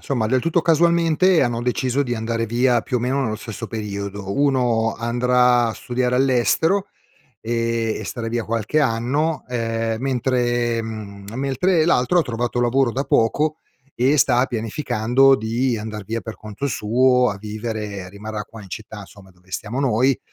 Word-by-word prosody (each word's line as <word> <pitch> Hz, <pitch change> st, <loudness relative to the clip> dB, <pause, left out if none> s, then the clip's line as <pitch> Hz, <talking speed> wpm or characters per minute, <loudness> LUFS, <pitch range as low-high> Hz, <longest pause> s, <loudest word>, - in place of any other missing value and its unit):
somma 115 Hz, -6 st, -1 dB
del 130 Hz, -, +3 dB
tutto 165 Hz, +3 st, +1 dB
casualmente 170 Hz, +1 st, +3 dB
hanno 120 Hz, -2 st, 0 dB
deciso 125 Hz, +3 st, 0 dB
di 120 Hz, -2 st, -2 dB
andare 115 Hz, +1 st, -2 dB
via 120 Hz, +2 st, +2 dB
più 125 Hz, +2 st, -2 dB
o -, -, -6 dB
meno 130 Hz, +3 st, 0 dB
nello 110 Hz, -5 st, -1 dB
stesso 110 Hz, +1 st, -7 dB
periodo. 100 Hz, -2 st, -5 dB
Uno 125 Hz, -4 st, +1 dB
andrà 125 Hz, +1 st, +2 dB
a 115 Hz, -, -3 dB
studiare 125 Hz, 0 st, -1 dB
all'estero, 135 Hz, +9 st, +2 dB, 0.5 s
ehm, 115 Hz, -1 st, -1 dB
e -, -, -6 dB
starà 115 Hz, -2 st, -4 dB
via 115 Hz, 0 st, -2 dB
qualche 115 Hz, +6 st, -1 dB
anno, 140 Hz, +5 st, 0 dB
ehm, 115 Hz, -2 st, -2 dB
mentre 120 Hz, -2 st, 0 dB
mhmm, 105 Hz, -3 st, -7 dB
mentre 145 Hz, +6 st, +1 dB
l'altro 170 Hz, +1 st, +3 dB
ha -, -, +1 dB
trovato 120 Hz, -2 st, -2 dB
lavoro 120 Hz, 0 st, +2 dB
da 135 Hz, -, -1 dB
poco 150 Hz, +5 st, +1 dB, 0.4 s
e 130 Hz, +5 st, +3 dB
sta 125 Hz, -1 st, +4 dB
pianificando 120 Hz, +2 st, +2 dB
di 120 Hz, +2 st, 0 dB
andar 105 Hz, -1 st, -6 dB
via 115 Hz, +3 st, -3 dB
per 110 Hz, -, -8 dB
conto 110 Hz, +6 st, -5 dB
suo 125 Hz, +2 st, +3 dB
a 100 Hz, -, -6 dB
vivere. 105 Hz, -2 st, -5 dB
Rimarrà 105 Hz, +2 st, -6 dB
qua 110 Hz, -2 st, -12 dB
in 95 Hz, -, -13 dB
città 105 Hz, +1 st, -8 dB
somma 95 Hz, -1 st, -16 dB
dove 90 Hz, 0 st, -25 dB
stiamo 110 Hz, +7 st, -4 dB
noi, 130 Hz, 0 st, +2 dB
120 Hz, 160 wpm, -21 LUFS, 110-130 Hz, 0.5 s, sta